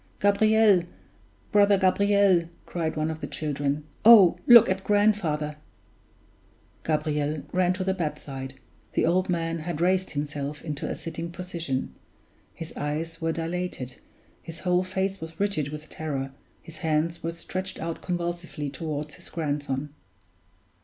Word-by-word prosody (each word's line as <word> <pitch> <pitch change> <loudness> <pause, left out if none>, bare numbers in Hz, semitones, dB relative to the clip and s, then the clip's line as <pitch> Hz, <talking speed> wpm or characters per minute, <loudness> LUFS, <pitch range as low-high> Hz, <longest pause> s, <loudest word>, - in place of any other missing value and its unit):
"Gabriel! 210 -1 +5 0.7
brother 205 -2 +5
Gabriel!" 190 -2 +3 0.2
cried 165 -2 -2
one 155 +1 0
of 160 0 -7
the - - -3
children. 145 -1 -2 0.2
"Oh, 200 -6 +8
look 240 -2 +10
at 190 0 -1
grandfather!" 190 -9 +1 1.3
Gabriel 150 -1 -1
ran 180 0 +3
to 185 0 -3
the 190 0 +1
bedside. 145 -6 -5 0.4
The - - +2
old 180 +3 +2
man 165 -1 -1
had 160 0 -4
raised 185 +2 +2
himself 145 0 -4
into 150 -3 -4
a - - -2
sitting 165 0 -6
position; 170 -7 -4 0.6
his 165 - -8
eyes 160 +3 -3
were 165 0 +1
dilated, 165 -5 -4 0.4
his 165 0 -9
whole 180 0 +2
face 190 0 -2
was 160 0 -8
rigid 200 -8 0
with 150 +1 -8
terror, 135 -4 -4 0.3
his 165 -1 -11
hands 160 +2 0
were 165 - -2
stretched 185 +3 -5
out 165 0 -4
convulsively 175 -4 -3
toward 150 0 -4
his - - -11
grandson. 145 -3 -3
165 Hz, 135 wpm, -26 LUFS, 150-185 Hz, 1.3 s, look